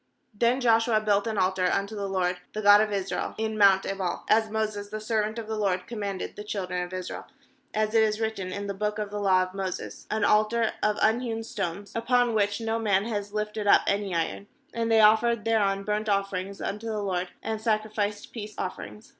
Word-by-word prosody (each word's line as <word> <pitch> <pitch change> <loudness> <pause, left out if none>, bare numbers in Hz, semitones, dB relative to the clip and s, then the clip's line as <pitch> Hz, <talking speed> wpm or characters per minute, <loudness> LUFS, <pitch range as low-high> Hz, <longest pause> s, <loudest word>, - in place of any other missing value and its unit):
80Then 240 +5 +2
Joshua 225 -2 +4
built 205 -1 +1
an 220 -2 -2
altar 185 -1 +2
unto 200 +2 -1
the 200 -1 -3
LORD, 180 -1 0
the 215 - -3
God 205 +1 +8
of 215 -1 0
Israel, 195 -1 -2
hi 220 - +1
mount 200 -3 +4
Ebal, 190 -3 -3
31as 220 0 +4
Moses 215 -2 -2
the 215 +1 -5
servant 215 0 -1
of 230 - -4
the 220 - -3
LORD 190 -4 0
commanded 200 -4 -4
the 210 - -7
children 185 -4 -3
of 180 0 -5
Israel, 185 -1 -6 0.4
as 215 0 0
it 225 - +5
is 215 0 +1
written 220 -5 -2
in 200 +2 -4
the 200 - -3
book 210 +2 -2
of 210 -1 -4
the 205 - -3
law 190 -2 +4
of 185 0 -7
Moses, 190 -2 -5
an 215 -1 +1
altar 215 +2 +3
of 210 0 +1
unhewn 225 0 +1
stones, 200 -2 -5
upon 240 +1 +2
which 205 -1 +1
no 225 0 -1
man 200 -3 +2
had 205 -3 -3
lifted 210 0 -3
up - - +7
any 200 -2 0
iron; 100 -12 -2 0.3
and 230 0 -1
they 225 -1 +6
offered 220 +1 +4
thereon 200 -3 +2
burnt 210 +1 -1
offerings 195 -1 -1
unto 210 +3 -4
the 215 -2 -2
LORD, 185 -2 -1 0.2
and 220 0 -3
sacrificed 215 -2 -1
peace 215 -2 -7
offerings. 105 - -6
210 Hz, 205 wpm, -27 LUFS, 195-220 Hz, 0.4 s, God